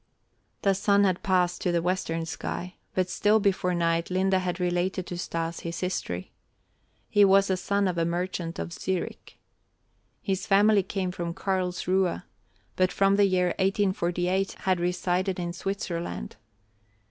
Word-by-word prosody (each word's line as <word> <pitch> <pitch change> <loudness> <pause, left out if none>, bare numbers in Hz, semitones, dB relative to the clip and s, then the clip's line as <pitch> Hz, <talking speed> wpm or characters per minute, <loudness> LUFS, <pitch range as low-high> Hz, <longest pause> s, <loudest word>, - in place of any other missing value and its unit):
The 195 - +4
sun 200 +1 +3
had 185 -2 +1
passed 180 -3 +1
to 180 - +1
the 170 - +2
western 170 -2 -1
sky, 180 +2 -5 0.2
but 185 -1 +1
still 210 +4 +3
before 185 -3 +1
night 170 0 +1
Linde 190 +1 +1
had 185 -1 0
related 180 +1 0
to 180 - -6
Stas 165 -1 -3
his 170 0 -5
history. 95 - -3 0.8
He 205 - +4
was 195 0 +5
a - - +3
son 200 +2 0
of 175 -2 -1
a - - +2
merchant 170 0 -2
of 170 - -5
Zurich. 185 0 -4 0.9
His 190 -2 -2
family 205 +1 +5
came 185 -1 -3
from 170 -2 -4
Karlsruhe, 185 - 0 0.5
but 185 -1 +2
from 195 +2 +3
the 200 0 +5
year 180 -1 +2
1848 190 -1 +1
had 185 -2 +1
resided 180 +1 0
in 175 -1 -3
Switzerland. 170 - -4
185 Hz, 145 wpm, -27 LUFS, 175-195 Hz, 0.9 s, was